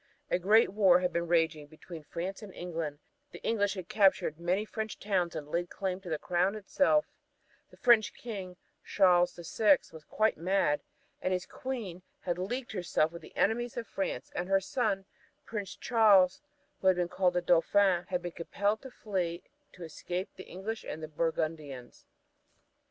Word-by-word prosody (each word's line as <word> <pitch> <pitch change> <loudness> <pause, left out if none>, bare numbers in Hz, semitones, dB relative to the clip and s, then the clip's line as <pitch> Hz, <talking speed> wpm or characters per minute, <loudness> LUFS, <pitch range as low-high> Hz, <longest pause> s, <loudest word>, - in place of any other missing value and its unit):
A - - +2
great 210 +5 +5
war 190 -3 +5
had 180 -1 0
been 170 0 -1
raging 160 -3 +1
between 160 +2 -10
France 180 +7 -5
and 210 -3 -9
England; 165 -4 -4 0.3
the - - -12
English 205 -3 +1
had 185 -3 -6
captured 190 -6 +3
many 180 +5 0
French 220 0 -5
towns 185 -5 -1
and 150 -2 -5
laid 170 +3 -2
claim 190 -1 -3
to 185 - -9
the 155 - 0
crown 180 +5 0
itself; 280 +8 +2 0.6
the - - -18
French 220 -5 +5
King, 195 -6 -7 0.3
Charles 180 -3 +4
the 170 - -9
Sixth, 195 0 +2
was 160 -1 -11
quite 220 +6 +1
mad; 170 -4 +1 0.4
his 185 -1 -1
Queen 225 -9 -5 0.2
had 175 -1 -2
leagued 245 +7 -3
herself 175 -5 0
with 170 0 -9
the - - -15
enemies 240 +3 +1
of 235 - -3
France, 195 - -4
and 180 +1 -3
her 195 0 +4
son, 195 -1 -1 0.4
Prince 205 -4 -5
Charles, 210 -2 +4 0.4
who 190 - 0
was 180 -2 +3
called 180 0 +2
the 180 - +2
Dauphin, 180 +1 +3
had 180 -1 -2
been 175 - -4
compelled 200 +5 -1
to 265 - -9
flee 185 -8 -3 0.3
to 180 - -10
escape 175 +3 -4
the 185 - -10
English 210 +5 -5
and 160 +1 -6
the - - -4
Burgundians. 155 -5 -3
185 Hz, 170 wpm, -31 LUFS, 170-205 Hz, 0.6 s, great